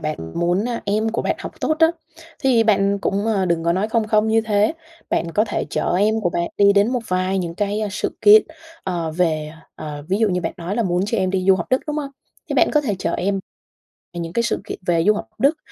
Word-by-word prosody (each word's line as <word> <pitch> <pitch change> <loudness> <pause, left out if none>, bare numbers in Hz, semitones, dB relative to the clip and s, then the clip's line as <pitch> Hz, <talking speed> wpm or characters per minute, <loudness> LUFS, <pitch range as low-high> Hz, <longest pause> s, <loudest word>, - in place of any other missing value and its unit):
bạn 155 0 -3 0.2
muốn, 175 +4 +1
à, 235 -1 -3
em 215 +2 0
của 230 - -2
bạn - - -1
học - - -9
tốt 310 - 0
á 325 - +7 0.5
thì 250 -4 +3
bạn 200 -2 +2
cũng, 200 +2 -1
ờ, 205 -4 +1
đừng 170 -1 0
có 170 - +2
nói 195 +4 0
không 225 -1 0
không 215 0 +2
như 225 0 +3
thế, 215 +2 +1 0.4
bạn 170 - 0
có 215 - +3
thể - - -2
chở - - -1
em 215 +2 +2
của 175 - 0
bạn 170 0 -1
đi 200 0 +5
đến 200 +3 +3
một 250 - 0
vài 185 +1 0
những 170 -2 -3
cái 205 +2 -1
sự 205 - -3
kiện, 215 +1 +8 0.4
ờ, 170 -4 -2
về 155 -2 0 0.2
ờ, 145 -1 -7
ví 195 - +1
dụ 220 -1 +3
như 180 -2 0
bạn 165 - -3
nói 180 +2 -4
là 235 - +2
muốn 180 -3 0
cho 230 +1 -1
em 185 -1 +1
đi 185 -1 -1
du 190 - +8
học 170 - -4
Đức, 255 - +3
đúng 300 0 -3
hông? 280 -2 -3 0.4
Thế - - 0
bạn - - +4
có 300 - +3
thể 240 -8 -1
chở - - -2
em 195 +1 -1 0.7
về 175 - -5
những 170 0 -5
cái 235 - +1
sự 230 - -1
kiện - - -6
về 170 -1 +2
du 210 - +6
học 205 - -4
Đức, 280 +6 +3
200 Hz, 260 wpm, -21 LUFS, 175-220 Hz, 0.7 s, kiện